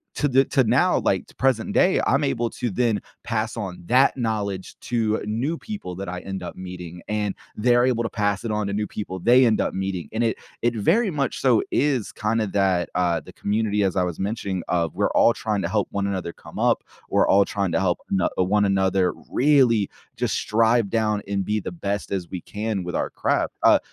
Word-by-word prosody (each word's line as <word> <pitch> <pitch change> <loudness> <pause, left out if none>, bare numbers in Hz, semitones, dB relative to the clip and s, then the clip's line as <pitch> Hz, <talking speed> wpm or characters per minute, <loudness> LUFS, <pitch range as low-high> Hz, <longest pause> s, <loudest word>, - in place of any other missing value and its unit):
to 145 - +1
the 135 0 +4
to 135 -3 +2
now, - - +3
like, - - 0
to - - -18
present 130 -4 +1
day, 185 - +4
I'm 140 +2 +2
able 120 -4 0
to 125 - -3
then 115 +1 0 0.2
pass 115 -1 -2
on 95 -6 -5
that 130 +6 +4
knowledge 105 -5 -2
to 110 -3 0
new 120 +10 -1
people 200 - -7
that 95 0 -5
I 90 0 -4
end 95 0 -6
up - - -7
meeting, 90 -2 -8
and 105 -2 -1 0.2
they're 120 +2 +3
able 120 -2 +1
to 115 - -2
pass 105 0 -1
it 115 - -2
on 105 -1 -1
to 100 - -3
new 105 0 -1
people 95 -3 -5
they 125 +7 +5
end 110 -2 +3
up - - -1
meeting, 95 -5 -3
and 110 - -2
it 115 - 0 0.2
it 120 0 +1
very 185 - +2
much 140 -4 -2
so 125 -5 +3
is 135 -6 +1
kinda 110 +1 0
that, 95 -3 +1
uh- 85 -3 +1
the - - -13
community, 105 0 0
as 95 -2 0
I 90 - +2
was 90 -2 -4
mentioning- 95 -3 -2
of 85 -3 0
we're - - +1
all 115 - +5
trying 105 -3 -2
to 85 - -2
help 105 -1 0
one 100 0 -1
another 95 -3 -3
come - - -11
up, - - +2 0.3
we're - - +3
all 100 +1 +5
trying 100 -2 -2
to - - +1
help 90 -2 +1
ano 95 -1 +2
one 100 +3 +2
another 95 -1 +2 0.2
really 125 -7 +4 0.3
just - - 0
strive 115 0 +2
down 105 -2 0
and 100 -1 -2
be 105 +1 0
the - - -5
best 100 - -3
as 90 -3 -3
we 90 - -5
can 105 -1 -3
with 90 0 -5
our - - -1
craft, - - 0
uh - - +6
105 Hz, 220 wpm, -23 LUFS, 95-115 Hz, 0.3 s, uh